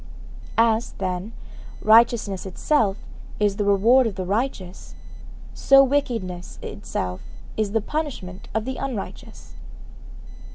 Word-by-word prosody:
As, 230 0 +2
then, 185 +2 -4 0.5
righteousness 220 -3 +4
itself 200 +1 +1 0.4
is 205 -1 +1
the 210 - 0
reward 225 +6 +4
of 210 - -4
the 185 -1 -4
righteous, 200 -3 -3 0.6
so 275 0 +6
wickedness 230 -10 -2
itself 90 0 -4 0.3
is 210 -2 -1
the 225 - +2
punishment 240 - -5
of 220 0 0
the 260 0 -4
unrighteous. 255 -7 -6
215 Hz, 110 wpm, -23 LUFS, 190-245 Hz, 0.6 s, so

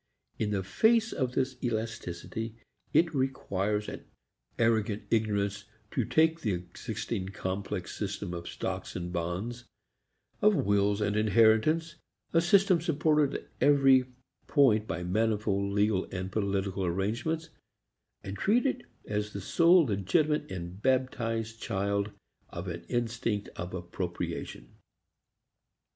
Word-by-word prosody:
In 105 - 0
the 100 -2 -1
face 225 - +3
of 125 -2 -1
this 130 0 -1
elasticity, 110 -1 -3 0.4
it 165 -1 +3
requires 105 -6 -1
an - - -7 0.5
arrogant 110 -2 +1
ignorance 100 -2 0 0.3
to 125 - 0
take 160 +4 +3
the 105 -7 0
existing 105 +2 -4
complex 95 -1 -4
system 100 -2 -3
of 85 0 -6
stocks - - -4
and 90 0 -4
bonds, 95 +9 -3 0.8
of 210 0 +5
wills 100 - +2
and 105 0 +1
inheritance, 115 +9 +3 0.4
a 165 - +5
system 185 0 +4
supported 155 -3 +2
at - - -6
every 135 -3 +6 0.4
point 110 -8 +4
by 85 +2 -3
manifold 100 0 0
legal 105 -1 +2
and 95 0 -4
political 100 -2 -1
arrangements, 115 - -1 0.7
and 95 +1 -6
treat 235 +7 +3
it 255 -2 0 0.2
as 105 0 -2
the 100 - -4
sole 170 - +5
legitimate 150 - +1
and 90 +2 -6
baptized 115 -3 0
child 100 +1 -1 0.4
of 85 +2 -6
an 85 -1 -5
instinct 115 -3 -1
of 90 +2 -5
appropriation. 85 -8 -5
110 Hz, 120 wpm, -30 LUFS, 100-130 Hz, 0.8 s, every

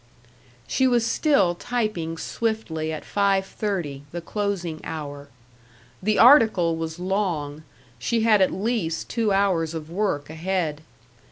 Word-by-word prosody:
She 260 - +2
was 240 -2 +2
still 225 - +3
typing 180 -6 -2
swiftly 170 -8 -2
at 155 - -6
five 200 -1 +1
thirty, 175 -11 -3
the 175 - -4
closing 180 -3 -3
hour. 145 -2 -6 0.7
The 210 +2 +1
article 220 - +6
was 160 0 -4
long; 175 -6 -2 0.4
she 230 - 0
had 220 -3 +4
at 190 - +4
least 195 -6 -2
two 225 -3 0
hours 180 -5 +1
of 160 0 -7
work 175 -7 -1
ahead. 160 -1 -2
185 Hz, 125 wpm, -24 LUFS, 160-215 Hz, 0.7 s, article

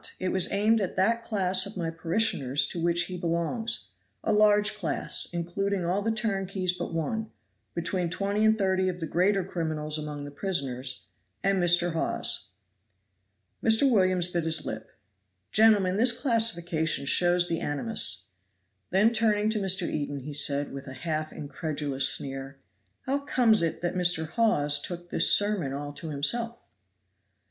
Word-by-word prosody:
It 185 - -2
was 185 -1 0
aimed 215 +2 +2
at 190 - -3
that 230 +5 +2
class 190 -4 0
of 200 - -10
my 165 -2 -2
parishioners 160 - +1
to 170 - -5
which 170 +1 +2
he 180 0 -6
belongs; 170 - -2 0.3
a 215 - +1
large 210 0 +4
class, 200 -7 -2
including 180 +2 -2
all 185 +4 0
the 220 - -1
turnkeys 195 -4 -1
but 180 - -5
one, 215 +7 -3 0.5
between 175 +1 -1
twenty 200 +4 -1
and 220 0 +4
thirty 190 -2 +1
of 180 -1 -5
the 165 - -3
greater 185 +4 +1
criminals 155 -4 -2
among 150 -1 -6
the 145 - -8
prisoners 135 -7 -2 0.4
and 195 -1 +2
Mr. 175 0 +3
Hawes." 165 - -2 1.2
Mr. 225 +3 +4
Williams 185 -6 +2
bit 170 -2 -1
his 160 0 0
lip. 110 0 -6 0.6
"Gentlemen, 205 -4 +4
this 240 +1 +3
classification 175 - 0
shows 175 +4 +3
the 165 - -1
animus;" 140 - -1 0.6
then 210 +5 +3
turning 215 -1 +2
to 215 - 0
Mr. 190 -2 +1
Eden 145 -2 -3
he 145 +3 -7
said, 145 -1 0
with 135 +1 -8
a 130 - -7
half 155 +2 -3
incredulous 145 -2 -1
sneer, 135 0 -3 0.4
"How 275 +2 -1
comes 245 -7 +3
it 165 +1 -2
that 175 - -1
Mr. 180 -3 +2
Hawes 150 -9 +2
took 175 +1 -7
this - - +4
sermon 205 -9 +1
all 145 +1 -5
to 160 - -7
himself?" 230 +12 0
180 Hz, 155 wpm, -27 LUFS, 155-210 Hz, 1.2 s, large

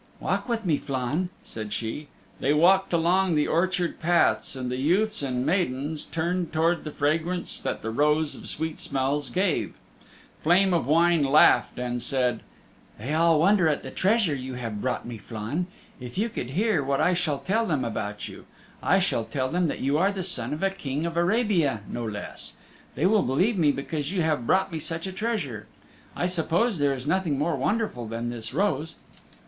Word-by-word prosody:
"Walk - - -2
with 225 -3 -1
me, 155 -5 +2
Flann," 140 +7 -2
said 110 -2 -7
she. 115 +8 -4 0.3
They 145 +3 +2
walked 190 +5 +4
along 175 +1 +2
the 150 - +3
orchard 180 +1 0
paths, 170 -4 +2
and 125 -1 -4
the 125 - -2
youths 195 +9 +2
and 130 -2 -1
maidens 150 -3 -1
turned 170 +2 -2
towards 165 +2 +1
the - - -3
fragrance 160 +5 -1
that - - -3
the 110 - -2
Rose 150 +4 +2
of - - -10
Sweet 160 -1 -3
Smells 140 +2 -1
gave. 185 -3 0 0.7
Flame 180 +4 +4
of 165 -7 +1
Wine 165 +1 +4
laughed, 140 +3 +5
and 125 -1 -2
said, 125 -2 0 0.6
"They 125 +8 -4
all 165 0 +4
wonder 185 +1 +4
at 150 - 0
the - - -7
treasure 200 -4 +2
you 130 -1 -5
have 115 -4 -5
brought 130 -1 -2
me, 120 -2 -7
Flann. 115 - -4 0.3
If 125 +2 -9
you 220 +4 +1
could 125 - -5
hear 185 - +1
what 135 0 0
I 180 - +3
shall 175 -5 0
tell 220 +9 0
them 145 -8 0
about 105 -2 -4
you! - - -11 0.3
I - - +3
shall 115 - 0
tell 130 +1 -2
them 175 +2 +1
that - - -4
you 140 +3 +1
are 195 +3 +3
the 195 -2 -4
son 130 -9 -2
of 150 +5 -3
a 195 - +2
King 150 -5 -3
of 170 -1 -3
Arabia 175 - +2
no 120 - -4
less. 105 -2 -6 0.4
They 155 - 0
will 210 +2 +4
believe 185 - +1
me 150 -3 +4
because 145 +2 -3
you 185 -4 0
have 150 -7 0
brought 190 0 +2
me 160 - -3
such 165 +2 -5
a 190 - -4
treasure! 185 - -3 0.5
I - - -1
suppose 180 +4 +1
there 140 -1 +2
is 130 0 -7
nothing 160 -2 +1
more 155 +3 0
wonderful 140 - -1
than 115 +2 -3
this 115 -2 -6
rose!" 165 -1 0
155 Hz, 190 wpm, -26 LUFS, 130-180 Hz, 0.7 s, laughed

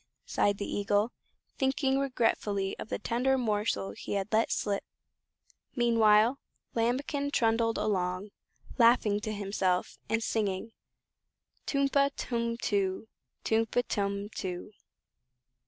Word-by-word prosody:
sighed 205 -1 +1
the 200 - -3
Eagle, 205 +3 +1 0.5
thinking 265 0 +2
regretfully 220 -7 0
of - - -7
the - - -1
tender 260 +3 +1
morsel 210 - 0
he 100 - -6
had 200 -1 -1
let 220 +1 +3
slip. 200 -1 -1 0.9
Meanwhile 230 0 +4 0.3
Lambikin 275 +5 0
trundled 230 -3 +2
along, 185 0 -1 0.5
laughing 230 -3 +5
to 215 +1 -4
himself, 195 -3 -1
and 225 0 +1
singing: 210 0 -1 1.0
"Tum 275 -1 +2
pa, 280 0 +3
tum 235 -1 -2
too; 200 -1 -1 0.3
Tum 225 0 +2
pa, 245 - +1
tum 200 0 -1
too!" 185 -2 -5
220 Hz, 115 wpm, -30 LUFS, 200-240 Hz, 1.0 s, laughing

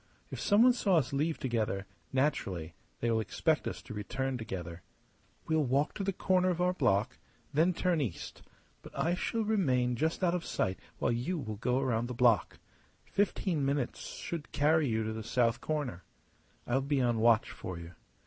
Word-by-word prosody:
If - - -5
someone 230 +4 +5
saw 205 -6 +2
us 135 -3 0
leave 155 +3 0
together, 110 -6 -1 0.3
naturally 115 - -1 0.3
they 115 - +1
will 115 - +2
expect 155 +8 0
us - - -5
to - - -8
return 130 +6 -2
together. 90 -7 -6 0.6
We'll 160 -1 +2
walk 140 +3 +1
to 200 - -4
the 195 - +1
corner 185 -1 +2
of 175 -1 -1
our 180 0 +2
block, 100 - +1 0.3
then 160 +5 +4
turn 175 -2 +1
east; 105 - -5 0.4
but - - -12
I 170 - +1
shall 225 +5 -1
remain 130 - +2
just 160 +8 -1
out 175 -1 +3
of 180 -2 -1
sight 95 -2 -1 0.2
while - - +1
you 125 +10 -1
will 110 -8 -5
go 125 +3 +1
round 120 -3 0
the 125 - -5
block. 120 -2 +3 0.5
Fifteen 190 -6 0
minutes 135 -2 -1 0.2
should 165 -3 -6
carry 155 +1 +3
you 110 -2 0
to 110 0 -3
the 110 - -5
south 115 +1 +1
corner. 145 - -3 0.6
I'll 130 +3 +1
be 140 +1 0
on 120 -3 +2
watch 115 -1 +4
for 90 -2 -6
you. 85 +1 -9
130 Hz, 180 wpm, -31 LUFS, 115-165 Hz, 0.6 s, someone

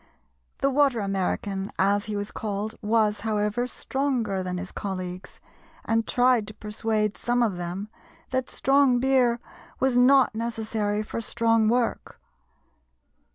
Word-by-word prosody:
The 275 - +2
"Water 275 -3 +3
American," 195 0 -2
as 200 +1 +2
he 215 0 -4
was 205 0 -3
called, 210 0 -3
was, 215 -1 +2
however, 210 +2 -1
stronger 250 -8 -1
than 180 -1 -3
his 185 +1 -6
colleagues, 185 -2 -6 0.5
and 225 0 +1
tried 245 -4 +3
to 215 - -9
persuade 210 -1 -1
some 240 0 +1
of 205 -6 0
them 180 +4 -4 0.4
that 260 -1 -1
strong 270 -2 +3
beer 250 -2 +3 0.4
was 265 -2 +2
not 260 0 +5
necessary 220 -2 -2
for 230 - -5
strong 225 -1 +2
work. 240 0 -1
220 Hz, 130 wpm, -26 LUFS, 205-245 Hz, 0.5 s, not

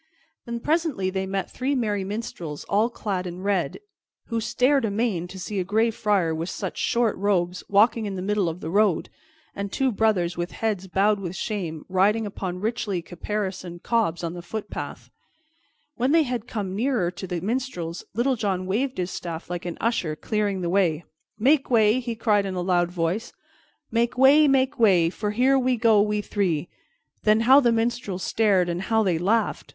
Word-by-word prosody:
Then 235 0 -3
presently 300 - 0
they 190 0 -2
met 195 -1 -3
three 270 +2 -1
merry 210 -6 0
minstrels, 190 -7 -5
all 210 +4 +1
clad 195 -6 -3
in 180 +1 -7
red, 195 -3 0 0.5
who 230 -1 -1
stared 255 +4 +2
amain 205 -5 -1
to 185 +2 -10
see 190 +2 -4
a - - 0
Gray 220 +5 +2
Friar 200 -7 +1
with 165 +3 -3
such 190 -3 -5
short 235 -2 +1
robes 185 -2 0
walking 215 +2 +3
in 195 - -4
the 185 - -4
middle 205 -3 +1
of 165 +2 -7
the 160 - -4
road, 200 -3 +2 0.5
and 200 0 -4
two 265 -1 +1
brothers 195 -5 +1
with 175 +1 -4
heads 205 -4 -2
bowed 200 +3 +2
with 185 -2 -5
shame, 180 -9 -4
riding 205 +4 +2
upon 185 -3 -5
richly 210 -5 -2
caparisoned 185 -1 -5
cobs 215 -8 0
on 165 0 -3
the 175 - -7
footpaths. 210 +5 -6 0.9
When 255 +5 +1
they 330 -1 +5
had 245 -4 -4
come 195 -4 -4
near 225 -6 0
to 190 +1 -7
the 175 -1 -3
minstrels, 190 -5 -3
Little 255 +3 +2
John 195 -5 -1
waved 250 +8 -1
his 180 0 -2
staff 170 0 -6
like 175 -1 -4
an 175 - -5
usher 205 -9 0
clearing 205 +1 -1
the 175 - -1
way. 175 -4 +1 0.3
"Make 270 +5 +3
way!" 220 -1 +4
he 235 -2 -4
cried 210 -3 +2
in 190 - -4
a 180 - -1
loud 175 -1 +2
voice. 180 +6 -2 0.6
"Make 235 +2 0
way! 285 +4 +7
make 270 0 +2
way! 180 -7 +4
For 210 +2 -3
here 255 +5 +3
we 255 -1 +1
go, 220 -2 +5
we 210 0 0
three!" 175 -7 -1 0.5
Then 215 +1 +3
how 260 +4 +7
the 240 -4 +3
minstrels 230 -5 -1
stared, 200 -5 +2
and 175 +1 -2
how 220 +2 +2
they 180 -5 +1
laughed! 220 +6 0
205 Hz, 185 wpm, -24 LUFS, 180-230 Hz, 0.9 s, way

